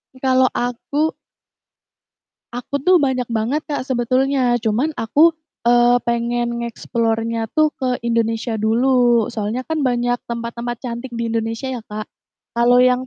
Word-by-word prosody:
I - - -14
kalau 260 0 +4
aku 280 +6 -1 1.4
aku 255 +3 -4
tuh 365 +1 +5
banyak 255 -4 0
banget, 230 +7 0
Kak, 285 -3 -4
sebetulnya, 255 0 +1
cuman 230 +6 0
aku, 295 +9 +4 0.3
eee, 240 +1 +5
pengen 235 0 -1
nge-explore-nya 230 -1 -2
tuh 310 0 +4
ke 255 -3 -1
Indonesia 230 -1 -1
dulu, 240 +1 +3
soalnya 225 +2 -3
kan 310 0 -1
banyak 245 0 +1
tempat-tempat 235 0 -4
cantik 240 0 -6
di 235 0 -2
Indonesia 225 +3 -2
ya, 255 - -3
Kak, 210 0 -7 0.4
kalau 245 +1 +4
yang 255 0 +2
240 Hz, 135 wpm, -20 LUFS, 230-260 Hz, 1.4 s, tuh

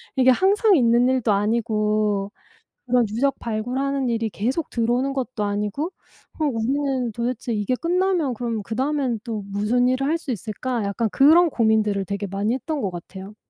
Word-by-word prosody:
이게 260 -1 +4
항상 395 - +4
있는 240 -3 +4
일도 255 -4 +1
아니고 210 -1 0 0.6
그런 250 -1 +3
유적 270 +6 0
발굴하는 255 +4 -2
일이 230 -1 -1
계속 250 - -2
들어오는 245 +3 0
것도 255 -4 -3
아니고 210 - -2 0.5
그럼 300 -5 0
우리는 260 +1 -1
도대체 235 +1 -3
이게 210 +3 0
끝나면 345 -2 0
그럼 230 -2 -3
그다음엔 255 +1 -1
또 225 -4 -4
무슨 210 +5 +1
일을 255 +2 0
할 320 +3 +1
수 325 - -7
있을까?" 230 +2 -3
약간 200 +3 -1
그런 315 - +5
고민들을 220 -5 +1
되게 200 +1 -4
많이 200 +4 -1
했던 295 +3 -3
것 200 - -1
같아요. 190 +3 -9
235 Hz, 350 characters per minute, -23 LUFS, 210-270 Hz, 0.6 s, 그런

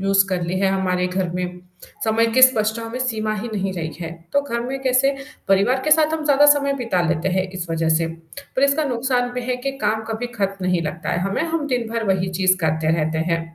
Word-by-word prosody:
Use 195 0 +3
कर 180 -2 -1
ली 180 +2 -2
है 195 - +3
हमारे 180 -1 0
घर 180 0 -2
में, 180 0 -4 0.4
समय 225 +1 +2
की 255 - +4
स्पष्टताओं 225 -2 +4
में 250 - -4
सीमा 220 -4 -1
ही 215 +3 -4
नहीं 195 -1 -1
रही 160 -3 -4
है, 165 -1 -4 0.2
तो 285 - +3
घर 235 -4 -3
में 265 +2 -4
कैसे 265 +1 +2 0.3
परिवार 200 +7 +3
के 305 - 0
साथ 310 0 +4
हम 315 -1 -4
ज़्यादा 290 0 +5
समय 280 -1 0
बिता 215 -8 0
लेते 170 +2 0
हैं 185 0 0
इस 175 - -4
वजह 165 0 0
से, 165 0 0 0.5
पर 265 - +2
इसका 280 +2 +2
नुकसान 245 -1 0
भी 250 0 -4
है 250 - 0
कि 275 - 0
काम 215 +1 +1
कभी 225 +2 -3
खत्म 195 -1 -1
नहीं 180 -2 +1
लगता 160 +1 -4
है - - 0
हमें, 195 - -1
हम 325 -2 -2
दिन 245 -4 -1
भर 230 0 -2
वही 185 0 -1
चीज़ 185 0 +4
करते 160 0 +1
रहते 160 0 -1
हैं। 165 - +1
215 Hz, 235 wpm, -21 LUFS, 180-255 Hz, 0.5 s, ज़्यादा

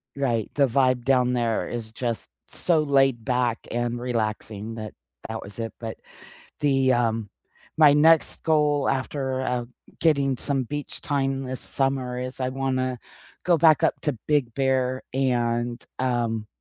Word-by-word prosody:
Right, 120 -6 0
the 140 -2 +4
vibe 130 -1 +2
down 125 -2 +3
there 115 -3 0
is 115 -2 -5
just 120 -4 -3 0.2
so 165 -3 +1
laid 135 -5 +2
back 125 -1 0
and 120 0 -1
relaxing 110 -2 -3
that, 110 -1 -7 0.3
that - - -5
was 100 +3 -11
it, 115 -1 -4
but, 115 -1 -6 0.6
the, 135 -3 +3
um 115 -3 0 0.5
my 150 -2 +8
next 160 +2 +4
goal 150 -3 +2
after, 130 0 -2
uh, 125 -2 -1 0.3
getting 140 -4 +2
some 135 0 0
beach 145 +4 -5
time 135 -2 -1
this 130 0 -4
summer 135 -2 -1
is 130 +1 -5
I 130 -1 0
wanna 130 -1 -1 0.5
go 175 - +5
back 155 -1 +5
up - - +1
to 145 -6 -1
Big 145 -6 +2
Bear 130 -1 0
and, 120 -2 0 0.2
um, 120 -4 -1
130 Hz, 150 wpm, -25 LUFS, 120-135 Hz, 0.6 s, my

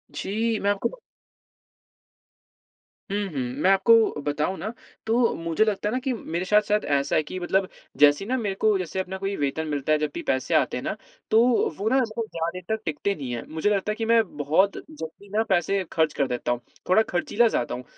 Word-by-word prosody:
जी, 220 +2 -1
मैं 200 - 0
आपको 205 - -1 2.2
हुँ, 200 - 0
हुँ। 140 - -2 0.2
मैं 185 - +5
आपको 220 -3 +4
बताऊँ 150 +6 -1
ना, 215 +6 -4 0.3
तो 230 +1 +2
मुझे 165 +4 +1
लगता 210 -1 -1
है - - -3
ना 255 - 0
कि 265 - 0
मेरे 175 -5 -4
साथ-साथ 210 +1 +2
ऐसा 140 0 0
है 155 - +3
कि 185 +5 -6
मतलब 185 +2 +1 0.3
जैसे 145 +5 +5
ही - - -8
ना 260 - +1
मेरे 205 -5 -2
को, 215 0 +2
जैसे 185 +1 -4
अपना 190 0 -3
कोई 195 +1 -3
वेतन 150 +1 -2
मिलता 145 0 -2
है, 155 - +5
जब 150 -1 -1
भी - - -4
पैसे 130 +5 0
आते 140 -5 +2
हैं 125 - -5
ना, - - -2 0.4
तो 220 - +6 0.4
वो 205 +3 -2
ना, 265 - +3
ऐसा 245 -4 +1
कोई 230 -1 -2
ज़्यादा 165 0 -2
देर 185 - -8
तक 220 - -10
टिकते 160 +6 -1
नहीं 130 -4 -6
हैं। 115 - -5
मुझे 160 +6 0
लगता 205 0 0
है 215 - -3
कि 225 - -3
मैं 230 0 +5 0.2
बहुत 160 +8 +2
जल्दी 200 - -10
ना 220 - +4
पैसे 190 +1 +2
खर्च 160 -2 +1
कर 140 - 0
देता 120 -1 -2
हूँ, 120 - -1 0.3
थोड़ा 200 +4 +6
खर्चीला 210 +6 +2
ज़्यादा 125 - -1
हूँ। 125 - -7
190 Hz, 220 wpm, -25 LUFS, 155-215 Hz, 2.2 s, तो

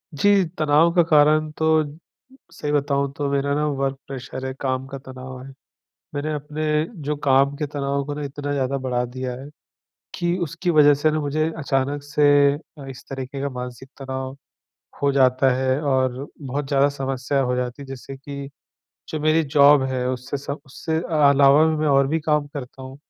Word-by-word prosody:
जी, 200 +4 +4 0.2
तनाव 155 +2 +4
का 175 - +6
कारण 155 0 +4
तो 160 0 +3 0.7
सही 150 -3 -4
बताऊँ 140 -1 +1
तो 145 -1 -1
मेरा 140 0 0
ना 150 0 0
वर्क 135 -1 -1
प्रैशर 130 0 -6
है 130 - -3
काम 130 -1 -1
का 135 0 -7
तनाव 130 -1 -9
है। 135 - -10 0.7
मैंने 150 +2 -2
अपने 150 +1 -5 0.4
जो 150 +1 -2
काम 135 +1 +4
के 150 - -2
तनाव 140 -1 -2
को 145 0 -4
ना 150 - -5
इतना 145 +1 -4
ज़्यादा 140 -1 -1
बढ़ा 125 -2 -1
दिया 125 +1 -5
है, 140 - -9 0.7
कि 175 0 0
उसकी 170 +3 -3
वजह 150 -3 +6
से 155 +2 +1
ना 155 - 0
मुझे 155 +2 0
अचानक 140 -1 -1
से 145 -1 +4
अ, 145 -1 -11
इस 130 - -10
तरीके 135 0 -5
का 140 - -1
मानसिक 125 0 -7
तनाव 130 0 -5 0.7
हो 140 0 +3
जाता 130 0 +4
है 130 +1 +1
और 130 -1 0
बहुत 140 +1 -3
ज़्यादा 140 0 +3
समस्या 135 0 -2
हो 125 -1 0
जाती 125 +2 -3
है - - -8
जिससे 135 +1 -8
कि 140 0 -8 0.6
जो 155 - -4
मेरी 155 +1 +3
जॉब 145 -1 +6
है 125 -1 -1
उससे 130 +2 -3
सब 140 +1 -6
से 160 -1 -3 0.3
अलावा 140 +2 +6
मैं 155 0 0
और 140 -1 +4
भी 160 +1 0
काम 150 -1 +1
करता 130 -1 -7
हूँ 130 +1 -9
140 Hz, 180 wpm, -22 LUFS, 130-150 Hz, 0.7 s, का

